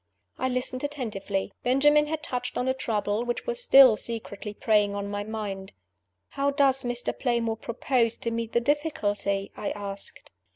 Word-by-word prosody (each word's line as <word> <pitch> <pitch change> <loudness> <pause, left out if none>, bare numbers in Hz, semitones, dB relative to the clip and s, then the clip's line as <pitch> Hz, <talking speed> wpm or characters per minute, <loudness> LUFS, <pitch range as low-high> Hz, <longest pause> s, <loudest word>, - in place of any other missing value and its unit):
I 260 - 0
listened 255 +1 -2
attentively. 215 -9 -3
Benjamin 295 +4 +4
had 310 0 -3
touched 250 -1 -3
on 250 - -1
a 260 - +3
trouble 215 -4 -1
which 240 0 -3
was 485 0 +1
still 270 - +8
secretly 215 -2 -5
preying 210 -1 +2
on 200 0 -3
my 205 0 -2
mind. 205 -3 -5 0.6
"How 280 0 0
does 275 -2 +2
Mr. 245 0 -2
Playmore 235 -3 0
propose 235 0 0
to 235 -3 -3
meet 230 0 -3
the 235 - +3
difficulty?" 205 -9 -1
I - - -3
asked. 200 -1 -7
235 Hz, 160 wpm, -27 LUFS, 205-270 Hz, 0.6 s, still